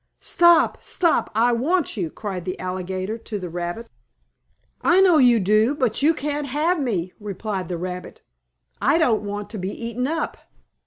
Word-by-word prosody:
"Stop! 345 -2 +4
Stop! 345 -4 +1
I 235 +2 +3
want 300 +9 0
you!" 180 -7 -2
cried 190 -1 -6
the 185 +1 -5
alligator 185 +3 -4
to 220 -1 -5
the 180 -3 -6
rabbit. 175 +7 -4 0.9
"I 355 +2 +4
know 365 -5 +6
you 245 -3 +5
do, 215 +7 +3
but 255 -5 0
you 315 +3 +4
can't 295 0 -3
have 310 +6 0
me!" 190 - -2
replied 200 -2 -4
the 175 - -3
rabbit. 180 +1 -7 0.6
"I 320 - +3
don't 245 -10 +2
want 205 0 -5
to 215 - -5
be 185 +1 -3
eaten 235 +4 -3
up!" 325 +2 -2
225 Hz, 165 wpm, -22 LUFS, 185-290 Hz, 0.9 s, know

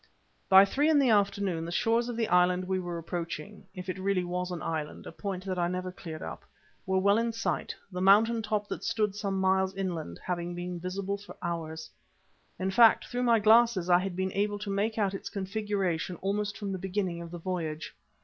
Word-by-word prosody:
By 190 +1 +9
three 285 +9 +1
in 315 - +5
the 270 -4 +4
afternoon 200 -4 +1
the 170 - -5
shores 230 +5 +1
of 235 - -4
the 225 -2 +1
island 180 0 +3
we 190 0 0
were 175 -1 -4
approaching 170 +3 -6
if 180 0 -7
it 185 +1 -4
really 190 -1 +1
was 180 +1 -3
an 175 -2 -5
island, 155 -2 -4
a - - -7
point 195 -2 -5
that 185 -2 -2
I 175 - +2
never 185 +1 -3
cleared 160 -3 -8
up 80 - -7 0.4
were 190 0 +2
well 200 +3 +4
in 230 0 0
sight, 225 0 -2 0.2
the 180 0 -4
mountain 220 +4 +5
top 210 -1 -1
that - - -5
stood 210 -3 0
some 200 -2 -2
miles 190 0 +2
inland 170 - -4
having 175 -1 -3
been 175 0 -5
visible 195 +3 -3
for 205 - -12
hours. 160 -2 -4 0.7
In 190 +1 -1
fact, 230 +1 +6
through 245 0 -3
my 235 -2 +4
glasses, 220 -4 +4
I 175 - +7
had 185 -1 -3
been 190 0 -2
able 205 +1 0
to 205 -1 -5
make 210 +3 0
out 200 -3 +1
its 195 - -5
configuration 195 -3 -2
almost 205 +1 -1
from 205 -2 -4
the 190 - -3
beginning 185 -2 -2
of 170 - -7
the 175 - -7
voyage. 165 -3 -4
190 Hz, 210 wpm, -29 LUFS, 180-205 Hz, 0.7 s, By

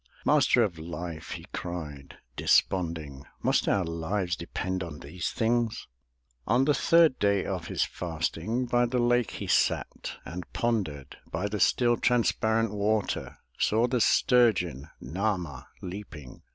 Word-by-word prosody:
"Master - - +4
of 85 -6 -2
Life!'' 85 0 -6
he - - -8
cried, 75 -6 -6 0.2
desponding, 80 -7 +1 0.2
"Must - - +2
our 100 - +2
lives 85 +2 -2
depend 95 +2 -4
on 80 -4 -7
these 80 +3 -4
things?" 115 -1 0 0.6
On 125 +3 +3
the 150 - +4
third 165 -2 +4
day 100 -1 +2
of 90 -4 -3
his - - 0
fasting 90 +8 -2
By 120 0 +2
the 125 +1 -1
lake 120 -1 +2
he - - -6
sat - - 0
and 90 +1 -7
pondered. 90 - -2
By 90 +6 -1
the 105 0 -3
still, 120 +2 +3
transparent 115 -2 +2
water; 105 0 -1 0.2
Saw 110 +3 +3
the 125 -1 0
sturgeon, 95 - +3
Nah'ma, 85 -3 -3 0.2
leaping. 90 -8 -8
95 Hz, 135 wpm, -28 LUFS, 80-115 Hz, 0.6 s, Master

